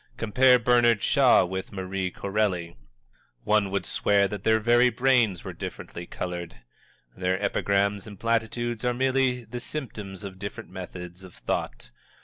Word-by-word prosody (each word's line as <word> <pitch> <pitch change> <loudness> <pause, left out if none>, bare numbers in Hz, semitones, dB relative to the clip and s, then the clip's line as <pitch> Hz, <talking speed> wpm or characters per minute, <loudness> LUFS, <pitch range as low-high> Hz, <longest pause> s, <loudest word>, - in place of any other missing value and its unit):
Compare 125 +3 +5
Bernard 120 -2 +3
Shaw - - +5
with 95 +1 -5
Marie 95 -1 -3
Corelli 95 -4 -2 0.7
one 105 -2 +2
would 100 0 -2
swear 100 -1 +2
that 100 -1 -6
their 110 0 +3
very 120 +3 +4
brains 120 -6 +2
were - - -6
differently 85 0 -7
colored! 90 -2 -5 0.6
Their 90 +1 -1
epigrams 100 0 0
and 100 -3 -11
platitudes 115 0 -1
are 125 0 +1
merely 130 -1 +1
the 120 +2 -7
symptoms 105 -9 -6
of 95 -2 -8
different 100 +1 -7
methods 90 +1 -8
of 95 -2 -13
thought. 60 - -4
105 Hz, 140 wpm, -26 LUFS, 95-120 Hz, 0.7 s, Compare